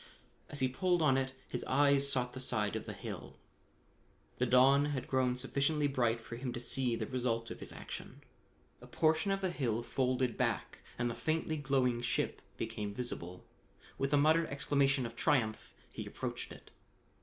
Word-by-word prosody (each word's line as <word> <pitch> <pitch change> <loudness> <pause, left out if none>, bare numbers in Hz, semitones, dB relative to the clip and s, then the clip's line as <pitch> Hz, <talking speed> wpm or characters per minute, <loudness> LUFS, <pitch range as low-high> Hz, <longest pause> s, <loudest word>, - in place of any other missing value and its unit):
As 145 - -1
he 130 - +4
pulled 175 +6 +1
on 135 -4 +5
it 130 0 -1
his 125 - -4
eyes 140 0 +4
sought 125 -2 0
the 130 - -6
side 105 -6 0
of - - -4
the - - -4
hill. - - -7 1.0
The 125 - +2
dawn 135 +3 +6
had 140 -4 -2
grown 130 -1 +1
sufficiently 140 +3 +1
bright 120 -4 +1
for 115 +1 -8
him 125 0 -3
to 120 - -4
see 125 0 0
the - - -2
result 120 -3 -1
of - - -7
his - - -6
action. - - -8 0.6
A - - -11
portion 160 +4 +2
of 195 0 +1
the 185 -2 0
hill 120 -8 -1
folded 125 0 0
back 115 - -1 0.2
and 120 - 0
the 120 - -1
faintly 160 +4 -1
glowing 135 -5 +1
ship 120 - -1 0.2
became 105 -1 -4
visible. 90 -7 -5 0.5
With 135 0 0
a 145 - +5
muttered 160 +3 +4
exclamation 140 -1 +1
of 115 0 -6
triumph 120 -6 +1 0.2
he - - -5
approached - - -5
it. - - -13
130 Hz, 180 wpm, -34 LUFS, 120-145 Hz, 1.0 s, dawn